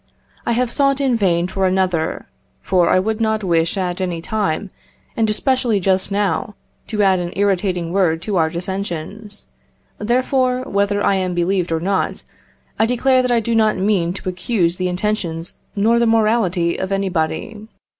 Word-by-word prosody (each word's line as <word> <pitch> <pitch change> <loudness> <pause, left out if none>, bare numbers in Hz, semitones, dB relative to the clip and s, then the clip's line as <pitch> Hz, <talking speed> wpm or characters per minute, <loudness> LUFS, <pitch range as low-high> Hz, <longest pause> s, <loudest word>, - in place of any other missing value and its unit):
I 235 - +2
have 245 0 0
sought 275 0 +2
in 265 -3 +2
vain 175 -5 +2
for 190 0 0
another, 185 -4 0 0.4
for 180 -3 +2
I - - +4
would 215 +4 -1
not 220 -1 0
wish 170 0 +1
at 180 0 -2
any 180 -3 -2
time, 200 -1 -2 0.4
and 225 -1 +1
especially 240 -1 +1
just 190 +1 +1
now, 205 +2 -1 0.3
to 210 -2 0
add 190 -2 +3
an 175 0 -3
irritating 185 -3 0
word 175 -5 +2
to 205 0 -2
our 160 -1 +3
dissensions; 190 +3 -5 0.5
therefore, 255 +3 +1
whether 200 -2 0
I - - +3
am 185 -1 -2
believed 175 0 0
or 165 - +1
not, 190 +3 -1 0.6
I 220 - +4
declare 255 +2 +3
that 250 - -1
I 235 -1 +3
do 230 +1 -2
not 220 -2 +3
mean 190 -3 +1
to 195 - -8
accuse 180 -2 0
the 185 - -1
intentions 180 -3 -2 0.2
nor 225 +3 +3
the 235 - +3
morality 215 -6 +2
of 190 +1 -4
anybody. 195 +2 -2
195 Hz, 165 wpm, -19 LUFS, 180-220 Hz, 0.6 s, I